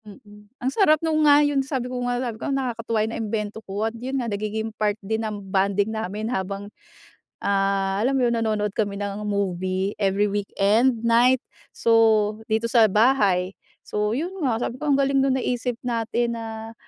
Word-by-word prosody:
Mm. 210 0 -15
Ang 260 +1 -2
sarap 310 -5 +4
no'ng 310 -1 +2
nga 290 +1 +6
yon. 290 -2 +1
Sabi 265 -2 -3
ko 250 0 -4
nga 245 0 0
sabi 240 -3 -4
ko, - - -3
"Nakakatuwa 230 -5 -1
'yong 220 - -5
naimbento 215 -1 -3
ko." 205 +1 -3
At 225 - -2
'yon 255 +4 -4
nga 250 - -1
nagiging 215 +2 -3
part 210 -1 0
din 220 +2 -1
ng 215 -2 -3 0.2
bonding 200 +2 +1
namin 215 -1 -4
habang, 200 -2 -4 0.7
ah, 195 0 0
alam 265 +3 +1
mo 250 - +3
'yon, 235 - +1
nanonood 215 -3 -1
kami 200 -2 -1
ng 200 0 -4
movie, 190 -1 -1
every 200 0 +1
weekend, 210 +4 +1
night. 240 +3 +5 0.3
So, 220 -2 +3
dito 220 +1 +1
sa 230 -2 +4
bahay. 200 -5 +3 0.3
So 210 0 -1
'yon 320 - -2
nga, 245 -6 +1
sabi 240 - -3
ko 295 +3 -3
ang 275 - +4
galing 275 -1 +2
no'ng 265 -1 +2
naisip 245 -1 -2
natin 235 0 -1
na 225 0 -7
220 Hz, 180 wpm, -23 LUFS, 205-245 Hz, 0.7 s, nga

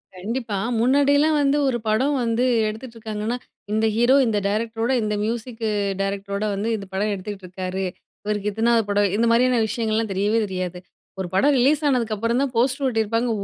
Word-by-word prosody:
கண்டிப்பா. 220 +2 -3 0.2
முன்னாடிலாம் 285 +5 +3
வந்து 285 +1 +2
ஒரு 255 -2 +1
படம் 260 +7 +2
வந்து 230 +1 +1 0.2
எடுத்துட்டுருக்காங்கன்னா, 220 0 -4 0.3
இந்த 220 +1 +1
ஹீரோ, 240 +3 +4
இந்த 215 -2 +1
டைரக்டரோட, 225 +3 -1
இந்த 210 0 -1
மியூசிக்கு 230 0 -3 0.3
டைரக்டரோட 200 +1 -3
வந்து, 205 +3 -2
இந்த 200 - -8
படம் 205 +2 0
எடுத்துட்டுருக்காரு. 190 -1 -5 0.4
இவருக்கு 210 0 -1
இத்தனாவது 225 +2 +2
படம். 205 0 +3
இந்த 230 - +2
மாரியான 245 0 +3
விஷயங்கள்லாம் 220 -1 -1
தெரியவே 205 +4 +1
தெரியாது. 185 -2 -4 0.4
ஒரு 190 - -2
படம் 285 +10 +4
ரிலீஸ் 285 +5 +3
ஆனதுக்கப்புறம் 230 -2 0
தான், 280 -2 0
போஸ்டரு 265 +3 +1
ஒட்டியிருப்பாங்க. 230 0 0
225 Hz, 145 wpm, -23 LUFS, 205-245 Hz, 0.4 s, ஹீரோ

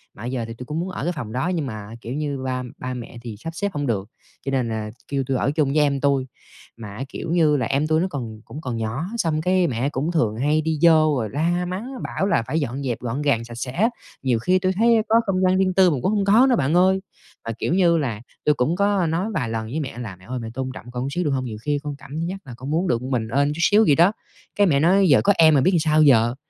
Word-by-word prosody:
mà 105 - -10
bây 125 - -3
giờ 125 -3 -2
thì 115 - -6
tui 125 +2 -9
cũng 150 +5 -3
muốn 180 +2 -3
ở 165 - -5
cái 175 - -1
phòng 125 -10 -6
đó, 130 +6 -1
nhưng 155 - -1
mà, 110 -3 -7
kiểu 120 - -6
như, 145 -2 -2
ba 130 -1 -3
ba 130 0 -5
mẹ 120 -1 -8
thì 115 -3 -7
sắp 165 - -5
xếp 200 +2 -2
hông 145 -2 -2
được, 100 -3 -2 0.4
cho 135 - -2
nên 130 -4 0
là 110 -1 -3 0.2
kêu 140 -1 -1
tui 135 -2 0
ở 140 - +1
chung 150 -2 +1
với - - +1
em 140 -1 +1
tui. 140 -2 +1 0.5
Mà 110 -3 -8
á, 135 - -3
kiểu 160 - -5
như 160 -4 +3
là, 125 - -1
em 140 +6 0
tui 155 +1 +2
nó 185 - +1
còn 115 -7 -6
cũng 150 - -9
còn 125 -5 -4
nhỏ, 115 +7 -3
xong 160 -7 0
cái 180 +1 +2
mẹ 125 0 -1
cũng 145 +4 -2
thường 115 -11 0
hay 150 +5 +2
đi 155 -1 -2
vô 170 - +8 0.3
rồi 110 -3 -2
la 170 +5 0
mắng, 190 +8 -5
bảo - - -2
là 115 - +2
phải 155 +5 0
dọn 140 -1 -3
dẹp 120 -4 -2
gọn 125 +4 -3
gàng, 140 -6 +1
sạch 120 - -10
sẽ 125 +2 -4
á, 210 - +2 0.3
nhiều 125 -4 +1
khi 185 +10 +2
tui 185 0 +1
thấy 225 +3 +4
có 220 - +4
không 190 -2 0
gian 185 0 +3
riêng 190 -1 +2
tư 185 -1 +5
mà 145 - 0
cũng 200 - +1
hông 200 -1 +1
có 225 +7 +5
nữa 250 - +4
bạn 140 - 0
ơi. 185 +2 +4 0.5
Mà, 115 - -2
kiểu - - 0
như 175 -2 +4
là, 120 -9 -2 0.2
tui 150 - +4
cũng 145 +6 +1
có 200 -2 +2
nói 170 +6 -1
vài 130 - -1
lần 110 0 -3
với 135 +8 -3
mẹ 135 -6 -5
là 110 -6 -6
"Mẹ 95 +1 -19
ơi, 130 0 -4
mẹ 115 - -6
tôn 130 +1 -3
trọng 125 - -10
con 125 +1 -3
chút - - -2
xíu 180 - 0
được 150 - 0
hông? 130 -1 -1
Nhiều 110 -3 -6
khi 145 +3 -1
con 145 -1 -4
cảm 145 +2 -8
giác 180 +3 -3
là 125 - -9
con 130 +3 -7
muốn 170 +4 +1
được 120 -5 0
m 130 - -5
mình 115 -4 0
ên 140 +4 +1
chút - - -8
xíu 210 +5 +5
vậy 145 - +5
đó", 175 +4 +5 0.4
cái 205 -1 +4
mẹ 140 -5 +3
nói: 190 +4 +4
"Giờ 140 - +6
có 200 - +5
em 160 -1 +6
rồi 135 - +4
biết - - +4
làm 170 - +3
sao 155 0 +3
giờ?" 120 -4 +4
145 Hz, 300 wpm, -22 LUFS, 125-175 Hz, 0.5 s, vô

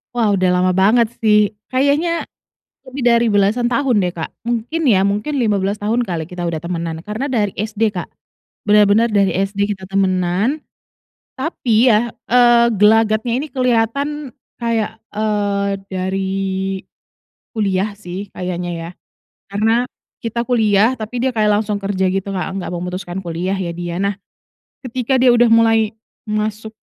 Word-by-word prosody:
Wah, 225 -4 +2
udah 185 -2 +2
lama 180 0 +2
banget 215 +5 +3
sih 210 -2 +4 0.2
kayaknya 285 +6 +1 0.7
lebih 260 0 -5
dari 235 0 +4
belasan 210 +4 +2
tahun 245 -3 +2
deh, 180 - 0
Kak, 160 - -5
mungkin 240 +8 -2
ya, 195 -3 +4
mungkin 210 +9 -1
15 205 -4 0
tahun 220 +4 0
kali 175 -8 -3
kita 180 +2 -8
udah 165 - -2
temenan 165 0 -4
karena 220 +7 -3
dari 210 -6 0
SD, 215 +1 -1
Kak, 180 - -5 0.6
bener-bener 210 +2 +5
dari 200 -2 +3 0.2
SD 200 +1 -9
kita 190 -2 -6
temenan, 195 - +1 0.7
tapi 255 -5 +2
ya, 225 +2 +2 0.2
eee, 240 -1 +6
gelagatnya 220 +2 +3
ini 295 - -3
kelihatan 260 +3 0 0.3
kayak, 225 -1 -1 0.2
eee, 205 -2 0 0.2
dari 190 +1 -2 1.3
kuliah 200 -1 0
sih 195 0 -7
kayaknya 180 -1 -3
ya 165 0 -6 0.6
karena 225 +4 +2 0.4
kita 235 +1 -2
kuliah, 220 -1 +3
tapi 220 +3 -5
dia 260 - +2
kayak 215 -1 +2
langsung 210 -1 -2
kerja 190 -1 0
gitu, 195 +1 -2
Kak, 190 +1 -3
nggak - - -5
memutuskan 180 +1 -5
kuliah 175 +2 -2
ya 180 -3 -3
dia. 175 0 -4
Nah, 200 +1 0 0.7
ketika 255 +2 0
dia 250 0 +5
udah 240 0 +5
mulai 225 -1 +4 0.4
masuk, 215 +1 -2
210 Hz, 145 wpm, -18 LUFS, 190-235 Hz, 1.3 s, eee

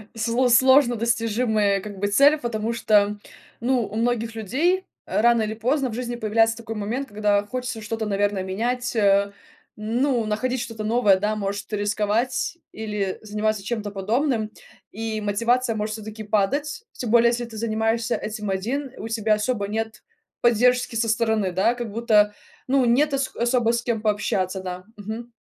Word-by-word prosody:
сл 235 +3 +1
сложно 260 0 +5
достижимая, 220 -3 +1
как 205 -1 -8
бы, 205 - 0
цель. 280 +9 +5
Потому 235 -3 -2
что, 210 -2 +2 0.4
ну, 245 +1 +1
у 215 - -9
многих 230 -1 -1
людей 325 - 0 0.2
рано 235 +1 +3
или 215 0 -2
поздно 260 +4 0
в - - -7
жизни 240 -1 -3
появляется 225 0 +2
такой 225 -1 -6
момент, 235 +7 -3
когда 205 0 +1
хочется 250 -1 -4
что-то, 220 +1 -3
наверное, 205 -1 0
менять. 245 +6 -2 0.9
Ну, 240 +2 +1
находить 250 +4 -1
что-то 225 -2 -6
новое, 215 -3 +3
да, 210 +2 0
может, 200 0 -4
рисковать 210 +9 0 0.2
или 210 -3 -3
заниматься 215 -1 -2
чем-то 210 -1 -3
подобным. 220 +3 0 0.4
И 220 0 -4
мотивация 230 +3 +1
может 215 0 -2
всё-таки 215 0 -8
падать. 280 - 0
Тем 240 -4 -4
более, 235 0 +6
если 240 0 -1
ты 225 -1 -10
занимаешься 225 +1 0
этим 215 -1 -4
один, 245 +8 -2
у 220 - -6
тебя 220 -1 +1
особо 210 -1 -1
нет 220 +1 -4 0.4
поддержки 245 +1 +3
со 225 0 +1
стороны, 220 -3 +1
да, 190 +6 +2
как 240 -4 -5
будто, 210 -2 +3 0.3
ну, 265 0 +3
нет 275 +5 +3
ос 275 -1 -1
особо 240 -1 +2
с 235 - 0
кем 235 -3 -2
пообщаться, 195 -3 0
да, 185 0 -6
мгм. 220 +4 -7
225 Hz, 160 wpm, -23 LUFS, 210-240 Hz, 0.9 s, более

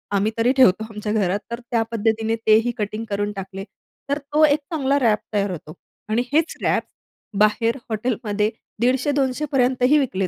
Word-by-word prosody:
आम्ही 205 +3 +1
तरी 235 +3 +3
ठेवतो 220 -5 +5
आमच्या 210 0 -4
घरात 200 -2 +1
तर 235 - -3
त्या 230 -2 +2
पद्धतीने 225 0 0
तेही 220 +2 +5
कटिंग 215 +1 -3
करून 205 +1 -1
टाकले. 195 0 -6 0.5
तर 285 - +1
तो 295 +2 +1
एक 295 +1 +3
चांगला 280 -4 0
व्रॅप 225 -6 +3
तयार 200 -2 +1
होतो 155 -2 -8 0.4
आणि 225 +2 +2
हेच 320 +2 +1
व्रॅप - - +1 0.6
बाहेर 225 +3 +2
हॉटेलमध्ये 215 -2 -1 0.3
150-200 265 +2 +1
पर्यंतही 255 +1 +3
विकले 195 -9 -1
225 Hz, 160 wpm, -22 LUFS, 210-260 Hz, 0.6 s, ठेवतो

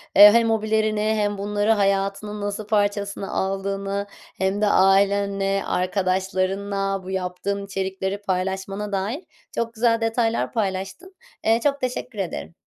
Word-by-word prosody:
eee, 205 0 +11
hem 230 0 +4
hobilerini 215 -1 +1
hem 210 -1 0
bunları 205 +2 0
hayatının 200 0 0
nasıl 205 +1 -4
parçasına 205 -1 0
aldığını 195 +1 -2 0.3
hem 190 +2 0
de 210 - +3
ailenle 195 0 +3
arkadaşlarınla 190 +1 -1
bu 185 - -7
yaptığın 190 +2 -3
içerikleri 190 0 -3
paylaşmana 190 +2 -2
dair 205 - -2 0.3
çok 230 0 -2
güzel 230 0 +2
detaylar 225 0 0
paylaştın. 200 - -3 0.3
Eee, 225 +1 +3
çok 280 -1 +1
teşekkür 250 -3 -4
ederim. 85 - -4
200 Hz, 125 wpm, -23 LUFS, 195-215 Hz, 0.3 s, eee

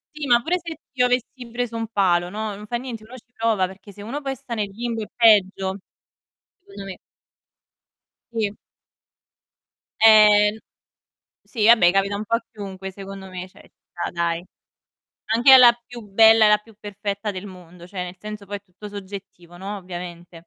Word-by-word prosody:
Sì, 295 -2 -5
ma 240 -1 +5
pure 360 +2 0
se 330 -2 -7
io 250 -2 +2
avessi 245 0 -3
preso 240 -1 -3
un 225 -1 -3
palo, 180 -5 +1
no, 215 0 -4
non 210 +1 -11
fa 240 - -3
niente, 235 -3 -6
uno 250 +4 -12
ci 245 +1 -20
prova, 220 -5 +1
perché 190 +2 -11
se 205 +1 -12
uno 275 +7 -5
poi 270 -1 -3
sta 235 - -8
nel 210 -3 -2
limbo 230 +2 -4
è 210 - -6
peggio, 195 -4 +3 0.8
secondo 385 - -11
me. 195 -1 -8 1.3
Sì. 215 -3 -1 1.5
Eh 210 -1 +7
n - - -10 0.9
sì, 220 -4 -1
vabbè, 220 -7 +6
capita 195 +1 +1
un 210 - -4
po' 230 +2 +1
a 230 - -8
chiunque, 195 -2 -8
secondo 195 0 -10
me, 185 0 -7
cioè, - - -20
ci - - -21 0.2
sta 175 - -4
dai. 170 -1 -2 0.9
Anche 235 +5 +5
alla 255 -2 +10
più 240 -1 -10
bella 220 +2 +5
e - - +6
la 210 - +5
più 215 0 -20
perfetta 205 0 -5
del 190 +1 -7
mondo, 180 -2 -13
cioè, 185 -1 -5
nel 180 +1 -9
senso 210 +1 -8
poi 205 +1 -5
è - - -19
tutto 200 +2 -12
soggettivo, 190 -3 -10
no, 200 +3 -6
ovviamente. 175 -2 -9
210 Hz, 180 wpm, -22 LUFS, 190-230 Hz, 1.5 s, alla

